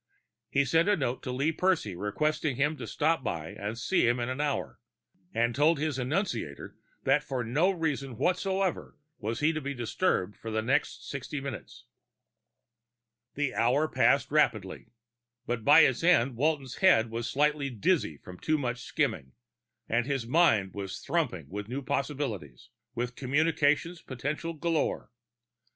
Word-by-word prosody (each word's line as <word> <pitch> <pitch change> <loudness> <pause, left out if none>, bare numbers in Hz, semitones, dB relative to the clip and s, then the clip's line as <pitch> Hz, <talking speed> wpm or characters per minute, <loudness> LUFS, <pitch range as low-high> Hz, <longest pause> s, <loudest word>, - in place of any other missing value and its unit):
He 140 0 +2
sent 165 +8 +3
a 205 - +3
note 130 -4 -2
to 125 - -4
Lee 140 +5 +1
Percy 160 - 0
requesting 145 - -1
him 145 +4 +1
to - - -6
stop 160 -2 +1
by 80 -8 -3
and 105 +3 -5
see 120 +3 +2
him 120 +1 +2
in 120 +1 -2
an 130 +3 -2
hour, 145 -1 -2 0.5
and 120 +1 +1
told 150 +6 +3
his 150 -2 -1
annunciator 125 - -2 0.3
that - - +3
for 130 -2 -3
no 145 - +2
reason 145 - -2
whatsoever 190 - -1 0.2
was 110 +4 -3
he 160 +2 +3
to 155 - -3
be 140 0 -4
disturbed 120 - 0
for 115 - -8
the 110 0 -1
next 130 +5 0
sixty 140 +1 -5
minutes. 135 -4 -8 1.5
The 145 -3 -1
hour 130 +7 +2
passed - - +2
rapidly; - - +1 0.6
by 125 +7 +5
its 130 0 +3
end, 135 -8 +4
Walton's 140 0 -1
head 115 -12 +4
was 115 0 -3
slightly 150 0 +1
dizzy 125 - 0
from 90 +4 -12
too 155 0 +1
much 125 -4 -2
skimming, 65 - -2 0.5
but 120 +2 0
his 135 -4 -1
mind 115 - +3
was 100 -2 -5
thrumming - - -2
with 105 +5 -6
new 135 +3 -4
possibilities, 125 - -3 0.2
with 120 +1 -3
communications 150 +4 +1
potentials 150 +6 -4
galore. 165 -7 -1
135 Hz, 150 wpm, -29 LUFS, 115-155 Hz, 1.5 s, by